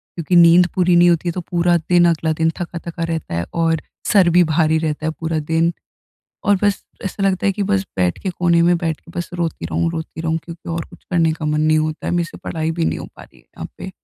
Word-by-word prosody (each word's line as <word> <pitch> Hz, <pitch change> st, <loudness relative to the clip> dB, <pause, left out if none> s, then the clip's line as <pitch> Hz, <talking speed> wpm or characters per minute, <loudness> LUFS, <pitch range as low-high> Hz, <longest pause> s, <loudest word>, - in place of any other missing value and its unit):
क्योंकि 170 Hz, +1 st, -1 dB
नींद 175 Hz, +1 st, +7 dB
पूरी 180 Hz, -1 st, +3 dB
नहीं 175 Hz, 0 st, +6 dB
होती 175 Hz, 0 st, +1 dB
है -, -, 0 dB
तो 180 Hz, -, -4 dB
पूरा 175 Hz, 0 st, +3 dB
दिन, 175 Hz, +1 st, +3 dB
अगला 160 Hz, -1 st, 0 dB
दिन 160 Hz, +1 st, +1 dB
थका-थका 170 Hz, -1 st, -5 dB
रहता 165 Hz, -, -3 dB
है 85 Hz, 0 st, -2 dB
और 165 Hz, -1 st, +1 dB, 0.3 s
सर 190 Hz, -4 st, +5 dB
भी 180 Hz, -, +7 dB
भारी 160 Hz, 0 st, +3 dB
रहता 155 Hz, -1 st, -2 dB
है 160 Hz, -, 0 dB
पूरा 160 Hz, 0 st, -3 dB
दिन। 160 Hz, +2 st, 0 dB, 0.7 s
और 205 Hz, -, +4 dB
बस 205 Hz, -1 st, +1 dB, 0.2 s
ऐसा 195 Hz, +1 st, -4 dB
लगता 195 Hz, -1 st, +1 dB
है 195 Hz, -, +3 dB
कि 205 Hz, +1 st, -3 dB
बस 200 Hz, -1 st, +1 dB
बैठ 90 Hz, -1 st, +1 dB
के 190 Hz, -, -1 dB
कोने 175 Hz, -1 st, +2 dB
में 175 Hz, +1 st, +4 dB
बैठ 165 Hz, -2 st, -2 dB
के 170 Hz, -, -17 dB
बस 175 Hz, -, -4 dB
रोती 165 Hz, -, -3 dB
रहूँ 85 Hz, +1 st, -1 dB
रोती 160 Hz, 0 st, -6 dB
रहूँ 160 Hz, 0 st, -1 dB
क्योंकि 170 Hz, 0 st, -10 dB
और 165 Hz, 0 st, -3 dB
कुछ -, -, -17 dB
करने 165 Hz, -3 st, +2 dB
का 155 Hz, 0 st, -6 dB
मन 150 Hz, 0 st, 0 dB
नहीं 155 Hz, 0 st, +3 dB
होता 155 Hz, 0 st, -3 dB
है। -, -, -1 dB
मेरे 175 Hz, -1 st, +1 dB
से -, -, -11 dB
पढ़ाई 160 Hz, 0 st, -2 dB
भी 165 Hz, 0 st, -1 dB
नहीं -, -, -1 dB
हो -, -, -7 dB
पा -, -, -11 dB
रही -, -, -18 dB
है -, -, -31 dB
यहाँ -, -, -9 dB
पे। -, -, -6 dB
165 Hz, 255 wpm, -19 LUFS, 160-175 Hz, 0.7 s, नींद